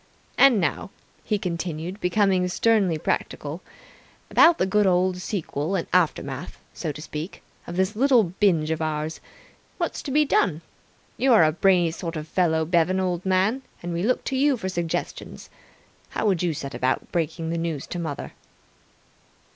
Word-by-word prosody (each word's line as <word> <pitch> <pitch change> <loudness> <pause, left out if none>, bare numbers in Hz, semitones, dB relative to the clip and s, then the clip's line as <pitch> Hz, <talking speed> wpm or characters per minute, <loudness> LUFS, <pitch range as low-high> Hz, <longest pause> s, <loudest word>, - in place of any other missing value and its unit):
And 270 -6 +6
now," 175 - -1 0.3
he 210 - 0
continued, 175 0 -4
becoming 185 0 +2
sternly 190 -2 +2
practical, 150 +1 -3 0.7
"about 335 0 +6
the - - +1
good 205 +1 +2
old 180 0 +2
sequel 180 -3 -3
and 175 - -1
aftermath, 180 -3 0 0.2
so 155 - -3
to 150 - -9
speak, 155 +3 -7 0.2
of 175 - -6
this 190 +3 0
little 255 -1 +4
binge 175 -4 +1
of 160 0 -2
ours. 155 0 -2 0.6
What's - - -2
to - - -6
be 300 +3 +3
done. 170 - +1 0.6
You're 245 -8 +5
a 155 - +4
brainy 175 0 +3
sort 165 0 -5
of 155 0 -5
feller, 160 -2 +1
Bevan, 175 +3 +2
old 180 -2 -1
man, 190 +7 +2 0.2
and 175 0 -3
we 170 - -2
look 245 +6 +1
to 270 - -3
you 275 0 +3
for 190 -4 -4
suggestions. 170 -3 -4 0.6
How - - -3
would 190 -5 +2
you 170 -3 0
set 140 0 -6
about 130 +1 -1
breaking 165 -1 -2
the 170 - -1
news 165 -4 -3
to 175 - -5
mother?" 160 -4 -5
180 Hz, 165 wpm, -24 LUFS, 160-195 Hz, 0.7 s, And